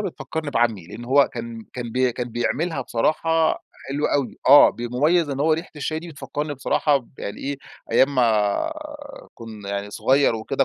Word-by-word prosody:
بتفكرني 160 -5 -4
بعمي، 115 -9 0
لإن 120 +7 -9
هو 140 +3 +4
كان 115 -2 -6
كان 120 -2 -6
ب 125 - -2
كان 125 0 -4
بيعملها 140 +7 -1
بصراحة 160 +6 +1 0.3
حلوة 145 +2 0
أوي، 140 -3 -1
آه، 145 +1 +9
ب - - -13
مميز 150 +8 +2
إن 135 0 -3
هو 160 +2 +3
ريحة 165 +3 -2
الشاي 155 +2 -2
دي 170 - -9
بتفكرني 145 0 -5
بصراحة 140 +2 +2
ب 130 -4 -7
يعني 100 - -6
إيه، 140 +1 -3 0.4
أيام 140 +2 +4
ما 115 - +2 0.6
كنا 105 -3 -6
صغير، 135 +3 +2
وكده 110 +5 0
135 Hz, 170 wpm, -23 LUFS, 115-150 Hz, 0.6 s, آه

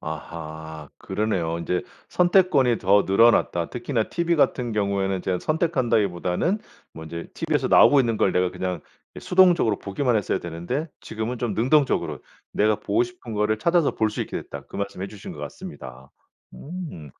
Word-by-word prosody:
아하 80 -1 -7
그러네요. 95 -5 -2
"인제 90 +1 -1 0.3
선택권이 175 - +3
더 100 +2 +4
늘어났다. 95 -4 +3
특히나 120 -2 -1
TV 170 +5 0
같은 125 -5 +1
경우에는 100 -2 0
제가 90 -1 -1
선택한다기보다는 120 - 0 0.4
먼저 80 +1 -7
이 - - -9
TV - - -3
에서 - - -1
나오고 145 - +7
있는 115 -3 0
걸 - - +2
내가 90 0 +1
그냥 90 -3 -3 0.3
이 - - -9
수동적으로 175 - +4
보기만 120 +4 0
했어야 105 - 0
되는데 85 - -4
지금은 110 +3 -4
좀 120 -4 -2
능동적으로 135 +6 +1 0.3
내가 105 0 +2
보고 345 - +1
싶은 360 - -7
거를 105 +1 +1
찾아서 170 0 +2
볼 110 -1 +1
수 - - -5
있게 - - -6
됐다." - - -9
그 - - -9
말씀 100 -2 -4
해주신 100 0 -7
것 - - -12
같습니다. 65 +1 -9 0.4
음 150 - -8
105 Hz, 375 characters per minute, -24 LUFS, 90-140 Hz, 0.4 s, 나오고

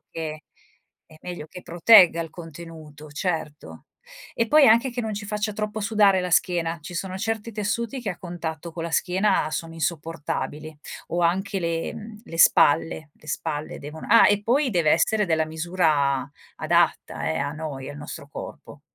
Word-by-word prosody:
che 155 -1 -6 0.6
è 155 - -17
meglio 175 -4 -7
che 180 - -11
protegga 175 -1 +6
il 165 -1 -5
contenuto, 160 -3 -11
certo. 155 -2 -4 0.5
E 230 - +1
poi 300 -2 +6
anche 235 +4 +4
che 245 - -4
non 220 -2 -3
ci 205 0 -6
faccia 210 +1 -2
troppo 210 +1 -4
sudare 205 -3 +3
la 180 0 -3
schiena. 170 -1 +1
Ci 165 +4 -9
sono 185 +2 -4
certi 225 +2 -3
tessuti 225 +5 -2
che 215 -5 -3
a 175 - -7
contatto 170 -3 -6
con 165 0 -5
la 170 - -4
schiena 190 -1 +1
sono 165 +1 -4
insopportabili, 155 -1 -4 0.3
o 175 - -1
anche 190 +3 0
le 165 -1 -2
mhmm, 215 0 -10
le 165 - -8
spalle, 155 -1 +4
le - - -22
spalle 150 +1 -4
devono 150 +2 -8
ah 230 0 +7
e 205 0 +2
poi 260 +4 +2
dev'essere 175 +5 +2
della 160 -2 +1
misura 155 -5 0 0.3
adatta 70 - +1
eh, 80 - -1
a 145 - -1
noi, 150 -4 -6
al 145 - -9
nostro 145 -1 -8
corpo. - - -9
170 Hz, 170 wpm, -24 LUFS, 155-205 Hz, 0.6 s, ah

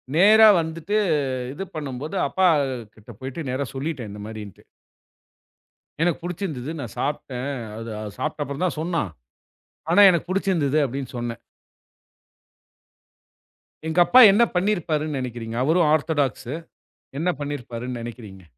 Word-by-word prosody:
நேரா 215 +5 +8
வந்துட்டு. 165 +5 -2 0.6
இது 195 +7 -5
பண்ணும்போது 145 +2 -5
அப்பா 190 -1 +3 0.5
கிட்ட 110 +2 -16
போயிட்டு 135 +2 -5
நேரா 135 +2 -2
சொல்லிட்டேன் 135 -5 -4
இந்த 105 - -9
மாதிரின்ட்டு. 105 -3 -9 1.4
எனக்குப் 170 0 +1
புடிச்சிருந்தது 160 -6 -4
நான் 120 -7 -6
சாப்ட்டேன். 135 -2 -3 0.3
அத 115 +1 -7 0.2
அது 105 - -6
சாப்பிட்ட 150 0 -2
அப்புறம் 140 +4 -4
தான் 175 - -2
சொன்னா. 165 +1 -1 0.9
ஆனா 195 - +5
எனக்குப் 175 0 -1
புடிச்சிருந்தது 175 -7 +1
அப்படின்னு 135 0 -5
சொன்னேன். 120 -1 -4 2.5
எங்க 160 +2 0
அப்பா 255 - +6
என்ன 210 +4 +5
பண்ணி 195 +4 +2
இருப்பாருன்னு 155 -4 -2
நெனைக்கிறீங்க? 120 -2 -5
அவரும் 160 +3 +3
ஆர்த்தடாக்ஸூ. 145 -4 0 0.6
என்ன 175 +3 +1
பண்ணி 145 0 -3
இருப்பாருன்னு 120 0 -6
நெனைக்கிறீங்க? 110 -5 -9
145 Hz, 125 wpm, -23 LUFS, 125-170 Hz, 2.5 s, நேரா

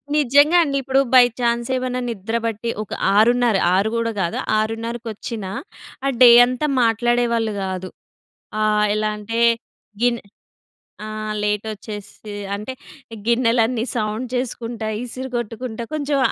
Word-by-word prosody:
నిజంగా 290 +3 +5
అండి. 280 -3 -1
ఇప్పుడు 265 +1 +2
బై 255 -1 +9 0.2
ఛాన్స్ 235 -1 0
ఏమన్నా 255 0 -2
నిద్రపట్టి 225 +1 -3
ఒక 210 - -18 0.2
6:30. 240 +1 +4 0.2
6 200 +3 +2
గూడా 230 0 0
కాదు. 170 -2 -1 0.2
ఆరున్నరకొచ్చినా! 225 -2 -4 0.5
ఆ - - +3
డే 250 - +10 0.2
అంతా 255 +4 -2 0.2
మాట్లాడేవాళ్ళు 235 -1 +1
గాదు. 185 -1 -4 0.7
ఆహ్, 210 0 +3
ఎలా 215 0 0
అంటే 225 +2 -4 0.6
గిన్ 240 -1 +2 0.9
ఆహ్, 215 0 -4
లేటొచ్చేసి 210 0 -5 0.2
అంటే 210 +6 -5 0.5
గిన్నెలన్నీ 235 -1 +2
సౌండ్ 215 +2 -2
చేసుకుంటా, 235 -3 -3 0.2
ఇసిరిగొట్టుకుంటా, 240 -2 -5
కొంచెం 290 -2 0
230 Hz, 110 wpm, -21 LUFS, 215-245 Hz, 0.9 s, డే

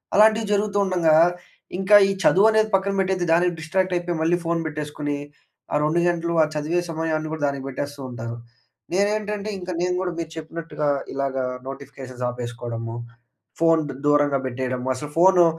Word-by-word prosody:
అలాంటివి 220 +2 +5
జరుగుతూండంగా, 195 -6 +2 0.6
ఇంకా 195 +2 +5
ఈ - - +2
చదువు 195 +4 +6
అనేది 220 0 +3
పక్కన 195 +1 0
పెట్టేసి 185 -1 0
దానికి 175 +1 +3
డిస్‌ట్రాక్ట్ 185 +4 0
అయిపోయి 175 -1 -2
మళ్ళీ 165 +2 +2
ఫోన్ 170 0 +1
పెట్టేసుకొని 150 -1 -3 0.6
ఆ - - +2
2 155 +3 +2
గంటలు 170 -1 0
ఆ - - +3
చదివే 155 +4 0
సమయాన్ని 160 -1 -2
కూడా 160 -2 -4
దానికి 140 -1 -3
పెట్టేస్తూ 140 +2 -5
ఉంటారు. 115 -1 -6 0.6
నేను 200 +3 +3
ఏంటంటే, 210 0 -4
ఇంకా 180 0 -5
నేను 180 0 +1
కూడా 185 -1 -1
మీరు 165 -1 -4
చెప్పినట్టుగా 160 -1 -4 0.3
ఇలాగా 135 -1 -1 0.2
నోటిఫికేషన్స్ 130 -2 -7
ఆపేసుకోవడము. 120 -1 -5 0.6
ఫోన్ 165 -1 +4 0.3
దూరంగా 145 -1 +3
పెట్టేయడము. 125 0 -3
అసలు 145 +3 -6
ఫోను 180 0 +6
160 Hz, 150 wpm, -23 LUFS, 140-185 Hz, 0.6 s, చదువు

